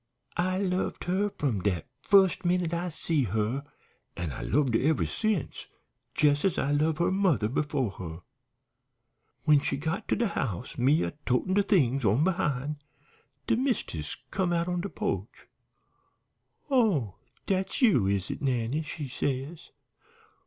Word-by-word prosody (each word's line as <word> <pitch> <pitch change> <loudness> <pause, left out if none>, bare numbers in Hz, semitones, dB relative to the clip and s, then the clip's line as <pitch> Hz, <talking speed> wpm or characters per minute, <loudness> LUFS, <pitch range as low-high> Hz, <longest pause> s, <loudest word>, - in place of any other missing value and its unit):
I 185 +1 +1
loved 185 -1 -1
her 190 +3 +1
from 120 -10 0
dat 90 -4 0 0.2
fust 195 -1 +4
minute 175 -1 +1
I 175 +1 -1
see 155 -3 0
her, 110 +6 -1 0.5
an' 85 -4 -3
I - - -6
loved 135 0 +1
her 115 - +3
ever 155 +3 +2
since, 215 -8 -2 0.5
jes' 145 -1 +4
as 195 - +1
I 140 - 0
loved 155 +2 +2
her 170 - +2
mother 185 - +2
befo' 135 -2 -1
her. 85 -3 -8 1.2
"When 150 -2 +5
she 140 - -1
got 160 +9 -3
to - - +2
de 235 - +1
house, 110 - -3
me 140 +6 +3
a - - -2 0.2
totin' 125 +9 +1
de 205 - +4
things 140 - +2
on 110 +7 +3
behind, 150 -6 0 0.7
de - - +2
mist'ess 230 - -2
come 185 -3 0
out 170 0 +1
on 180 -1 -1
de 200 - -4
po'ch. - - -4 1.3
"'Oh, 185 - +2 0.3
dat's 190 +7 -1
you, 130 - +5
is 100 -1 0
it, - - -6
Nannie?' 130 +1 0
she 150 -1 -6
says. 135 +4 -3
150 Hz, 150 wpm, -28 LUFS, 125-185 Hz, 1.3 s, When